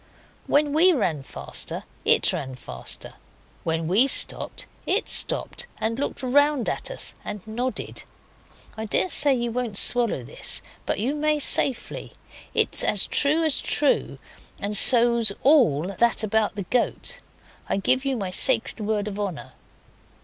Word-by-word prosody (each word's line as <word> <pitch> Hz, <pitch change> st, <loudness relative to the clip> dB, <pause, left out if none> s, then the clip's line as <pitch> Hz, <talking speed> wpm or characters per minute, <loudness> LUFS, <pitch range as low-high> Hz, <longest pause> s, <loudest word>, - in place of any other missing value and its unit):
When 290 Hz, 0 st, +1 dB
we 350 Hz, +4 st, +5 dB
ran 170 Hz, -, -1 dB
faster 135 Hz, -, -5 dB, 0.2 s
it -, -, +4 dB
ran 130 Hz, -1 st, -5 dB
faster; 125 Hz, -, -6 dB, 0.5 s
when 160 Hz, 0 st, -2 dB
we 210 Hz, +10 st, +3 dB
stopped -, -, +1 dB, 0.2 s
it -, -, +1 dB
stopped -, -, +2 dB
and 225 Hz, +3 st, -3 dB
looked 280 Hz, -, -3 dB
round 285 Hz, 0 st, +2 dB
at -, -, -2 dB
us, -, -, -1 dB
and 205 Hz, -1 st, -8 dB
nodded. 245 Hz, +4 st, -4 dB, 0.7 s
(I 220 Hz, -, -6 dB
daresay 285 Hz, -, +2 dB
you 240 Hz, -1 st, -3 dB
won't 235 Hz, -4 st, -2 dB
swallow 235 Hz, -, +2 dB
this, -, -, -4 dB, 0.2 s
but -, -, -1 dB
you 245 Hz, +7 st, -1 dB
may 300 Hz, 0 st, 0 dB
safely. 270 Hz, -3 st, 0 dB, 0.4 s
It's -, -, +3 dB
as 205 Hz, -, +3 dB
true 305 Hz, +3 st, +1 dB
as 315 Hz, -3 st, +1 dB
true, 290 Hz, -2 st, 0 dB, 0.4 s
and 205 Hz, +1 st, -3 dB
so's 235 Hz, -1 st, +5 dB
all 205 Hz, -, +3 dB
that 235 Hz, -1 st, +1 dB
about 215 Hz, 0 st, 0 dB
the 200 Hz, -, -4 dB
goat. 250 Hz, -, -2 dB, 0.5 s
I -, -, 0 dB
give 255 Hz, +7 st, +2 dB
you 270 Hz, -2 st, -2 dB
my 195 Hz, -4 st, -4 dB
sacred 235 Hz, +4 st, +3 dB
word 210 Hz, -1 st, -2 dB
of 205 Hz, 0 st, -6 dB
honour.) 195 Hz, -6 st, -6 dB
235 Hz, 145 wpm, -23 LUFS, 205-275 Hz, 0.7 s, we